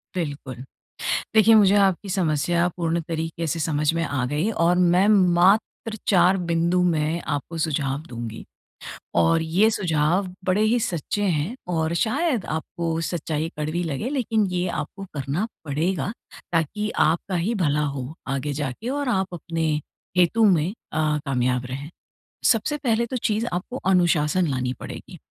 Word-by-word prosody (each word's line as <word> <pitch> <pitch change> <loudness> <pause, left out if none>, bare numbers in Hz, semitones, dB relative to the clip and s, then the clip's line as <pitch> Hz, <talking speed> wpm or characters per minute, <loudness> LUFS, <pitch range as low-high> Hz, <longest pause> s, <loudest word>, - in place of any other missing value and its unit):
बिल्कुल। 140 -7 -4 0.7
देखिए, 220 +1 +7
मुझे 205 -2 +6
आपकी 195 0 +2
समस्या 175 -1 +1
पूर्ण 170 -1 0
तरीके 165 0 -3
से 165 +2 -1
समझ 150 0 +1
में 165 - 0
आ 140 -4 -1
गई 150 - 0
और 175 -4 +2 0.2
मैं 190 +3 +4 0.3
मात्र 215 +4 +2
4 185 0 +5
बिंदु 170 +2 +2
में 165 -1 +1
आपको 155 +3 -3
सुझाव 145 -3 -1
दूँगी। 115 -2 -6 0.7
और 85 - +3
ये 180 +7 +3
सुझाव 175 -1 +1 0.2
बड़े 185 +3 +2
ही 225 +3 +3
सच्चे 180 +3 -2
हैं 180 - 0 0.2
और 160 0 0
शायद 245 - 0
आपको 165 0 -3
सच्चाई 160 -2 -2
कड़वी 155 +4 -1
लगे, 160 - -3
लेकिन 225 -6 +1
ये 180 0 -1 0.2
आपको 195 0 -9
करना 145 - -2 0.2
पड़ेगा, 160 +4 -1 0.4
ताकि 185 +6 0 0.2
आपका 170 +4 -1
ही 200 +8 0
भला 150 -6 +1 0.2
हो, 130 +3 -5
आगे 140 +2 -2
जाके 145 - -4
और 280 0 -1
आप 190 -4 +1
अपने 165 -1 -2 0.5
हेतु 180 +6 +4
में 180 -2 +3 0.2
अ, 155 - -1 0.3
कामयाब 125 -1 0
रहें। 140 +4 -6 0.6
सबसे 245 +6 +2
पहले 235 -5 +1
तो 255 +2 -3
चीज़ 225 -2 0
आपको 180 +8 -3
अनुशासन 175 -2 +3
लानी 130 -2 -1
पड़ेगी। - - -9
170 Hz, 145 wpm, -24 LUFS, 150-200 Hz, 0.7 s, देखिए